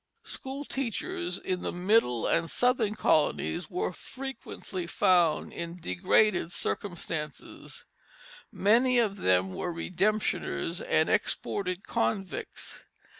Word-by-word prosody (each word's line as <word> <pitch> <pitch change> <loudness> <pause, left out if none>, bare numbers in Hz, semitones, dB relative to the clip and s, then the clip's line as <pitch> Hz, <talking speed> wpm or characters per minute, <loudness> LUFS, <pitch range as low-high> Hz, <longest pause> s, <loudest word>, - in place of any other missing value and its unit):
School 270 +2 -5
teachers 215 -9 -3
in 185 -2 -3
the - - -2
middle 180 - +2
and 165 0 +2
southern 245 -4 +2
colonies 165 +1 +1
were 180 -1 -2
frequently 235 -8 -6
found 170 -3 +3
in 170 +1 -5
degraded 170 - +2
circumstances; 160 -7 -4 0.7
many 245 +5 +4
of 215 -4 +2
them 95 - +2
were 180 - -3
redemptioners 195 +6 -1
and 475 - +4
exported 185 -1 -1
convicts. 175 - -2
185 Hz, 100 wpm, -29 LUFS, 170-220 Hz, 0.7 s, many